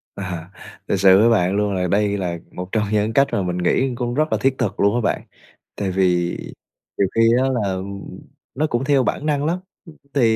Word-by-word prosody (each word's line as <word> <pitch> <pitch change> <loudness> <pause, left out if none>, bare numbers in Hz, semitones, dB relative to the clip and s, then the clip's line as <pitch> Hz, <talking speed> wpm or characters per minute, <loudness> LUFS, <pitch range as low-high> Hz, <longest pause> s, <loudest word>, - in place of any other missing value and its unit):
À, 90 -2 -6 0.4
thực - - +1
sự 95 0 +6
với 115 +2 +5
bạn 95 -3 +2
luôn 105 -1 0
là 90 -1 0
đây 100 +2 +1
là 90 -3 -3
một 90 +1 -7
trong 110 -2 +1
những 105 +1 +1
cách 140 +2 +4
mà 100 - 0
mình 90 -1 -2
nghĩ 130 +9 +1
cũng 120 -1 -2
rất 155 +4 0
là - - +2
thiết 135 0 +2
thực 115 -6 -2
luôn 100 +3 +3
á 120 - +1
bạn, - - 0 0.5
tại 100 -2 -2
vì 90 -2 +1 0.6
nhiều 100 - +2
khi 115 - +3 0.2
á 135 - +1
là 100 -7 -1 0.8
nó 155 +3 +1
cũng 120 0 -1
theo 135 -2 +3
bản 150 - -2
năng 145 -1 0
lắm. 175 +3 0 0.5
Thì 115 -5 +3
105 Hz, 215 wpm, -21 LUFS, 95-130 Hz, 0.8 s, sự